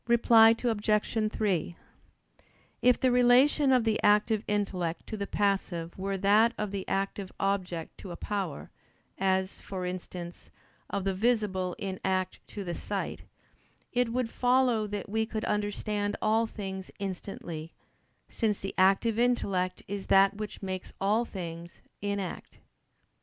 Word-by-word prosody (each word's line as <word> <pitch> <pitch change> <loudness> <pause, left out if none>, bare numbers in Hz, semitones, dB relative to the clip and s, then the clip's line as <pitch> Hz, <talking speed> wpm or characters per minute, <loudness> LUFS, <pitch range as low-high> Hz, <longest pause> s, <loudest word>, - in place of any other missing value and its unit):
Reply 230 -1 +6
Obj. 215 -1 +1
3: 185 -6 -1 1.1
If 250 0 +4
the 255 - +3
relation 250 +3 +5
of 250 -2 +4
the 220 -1 +1
active 210 +1 +3
intellect 185 -5 -1
to - - -5
the 200 -1 -4
passive 190 -4 -1
were 195 +1 -2
that 210 +5 +4
of 210 -2 -2
the 195 -2 -4
active 195 0 -2
object 185 -4 -2
to 195 - -9
a 175 - -6
power, 190 -6 -4 0.5
as, 190 0 0
for 185 -2 -5
instance, 180 -1 -7 0.4
of 200 - -2
the 195 0 0
visible 190 -4 0
in 190 -2 -4
act 185 -1 -1
to 205 - -6
the 175 -2 -4
sight; - - -4 0.7
it 245 -1 +1
would 240 -1 -1
follow 245 -3 +2
that 205 -1 -4
we 220 +2 0
could 220 -2 -3
understand 205 0 -1
all 225 +1 +2
things 190 -3 -6
instantly, 175 -4 -6 0.6
since 215 -3 -1
the 195 - -5
active 195 +4 +3
intellect 200 -7 +1
is 200 0 -5
that 195 0 +5
which 210 -1 -6
makes 185 -1 -5
all 215 +4 +2
things 170 -4 -8 0.2
(in 200 0 -1
act). 185 -3 -6
200 Hz, 140 wpm, -29 LUFS, 190-220 Hz, 1.1 s, Reply